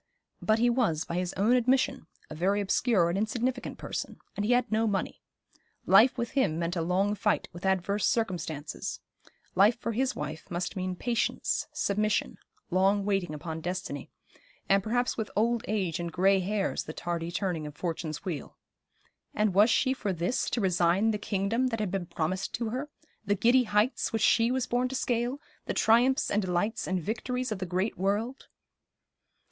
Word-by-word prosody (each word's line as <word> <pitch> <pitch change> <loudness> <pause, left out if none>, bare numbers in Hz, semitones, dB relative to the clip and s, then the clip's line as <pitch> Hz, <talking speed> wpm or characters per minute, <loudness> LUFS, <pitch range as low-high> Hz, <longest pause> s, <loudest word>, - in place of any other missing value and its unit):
But 215 0 +3
he 240 +2 +3
was, 225 -10 +1
by 170 - -3
his 180 0 -1
own 215 +6 +3
admission, 255 -7 +1 0.2
a - - -8
very 190 +6 +1
obscure 200 -2 +2
and 175 - -1
insignificant 245 +4 -2
person, - - -5 0.2
and 205 - -2
he 215 - +1
had 245 -1 +1
no 220 +1 +2
money. 200 -3 -2 0.6
Life 220 +8 +6
with 235 -1 -2
him 200 - +1
meant 170 +1 -2
a 170 - 0
long 185 +5 +1
fight 210 - 0
with 175 +2 -4
adverse 190 +2 +1
circumstances; 165 -9 -2 0.5
life 205 +6 +5
for 230 - -3
his 255 +3 0
wife 150 +2 -6
must 175 +3 -3
mean 185 -1 -2
patience, 235 +5 -1
submission, 210 +1 0 0.3
long 195 +2 +3
waiting 195 -6 0
upon 160 +1 -6
destiny, 175 -5 -4 0.6
and 195 0 +4
perhaps 245 +4 0
with 220 -2 -2
old 230 +2 +1
age 190 -7 -1
and 170 -1 -3
grey 190 +3 +3
hairs 195 +2 -1
the 155 - -6
tardy 170 0 -3
turning 175 -5 -2
of 150 - -9
Fortune's 165 -1 -4
wheel. 165 -8 -5 0.8
And 210 -2 +2
was 205 +5 +6
she 260 +3 +3
for 210 -6 -2
this 180 +7 -1
to 235 - -1
resign 185 +3 +3
the 210 - -2
kingdom 205 +5 0
that 225 -3 -2
had 210 -4 -1
been 185 -3 -2
promised 170 +3 -2
to 230 -2 -2
her, 260 +6 -4 0.3
the 205 -1 +1
giddy 240 +5 +4
heights 210 +4 +1
which 225 -2 0
she 230 +2 +4
was 255 0 0
born 245 +1 0
to 265 - -5
scale, 245 +1 -1 0.3
the - - -2
triumphs 245 +4 +3
and 210 - +2
delights 190 +4 -1
and 185 0 0
victories 250 +6 -3
of 210 - -2
the 185 - -3
great 185 +4 -1
world? 210 +7 -1
200 Hz, 180 wpm, -29 LUFS, 180-230 Hz, 0.8 s, Life